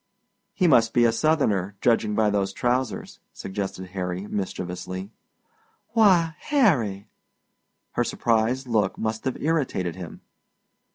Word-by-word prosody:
"He 185 - +2
must 115 -7 +4
be 120 - +5
Southerner, 115 - +1
judging 110 -3 +2
by 105 -1 +3
those 100 -1 0
trousers," 125 +1 -2
suggested 95 -1 -5
Harry 90 0 -4
mischievously. 95 -1 -5 0.8
"Why, 185 -8 +4
Harry!" 125 - +2 0.9
Her - - 0
surprised 120 +3 0
look 110 -6 0
must 110 +3 -3
have 130 - -1
irritated 135 - -1
him. 90 -3 -9
110 Hz, 110 wpm, -25 LUFS, 95-130 Hz, 0.9 s, be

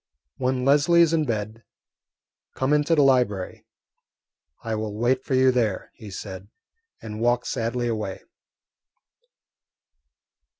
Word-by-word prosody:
"When 130 0 -1
Leslie 155 +5 +5
is 165 -1 +1
in 155 -2 +2
bed, 110 -1 -4 0.9
come 130 +2 0
into 150 +2 +3
the 145 - +4
library. 125 -8 +1 1.0
I 115 -1 -3
will 110 -1 -3
wait 125 +3 +1
for 130 - -1
you 130 0 +5
there," 115 -6 -1
he 110 -4 -11
said, 95 0 -8 0.6
and 110 0 -6
walked 120 +1 +1
sadly 120 +1 -2
away. 110 -4 -4
120 Hz, 120 wpm, -24 LUFS, 110-130 Hz, 1.0 s, Leslie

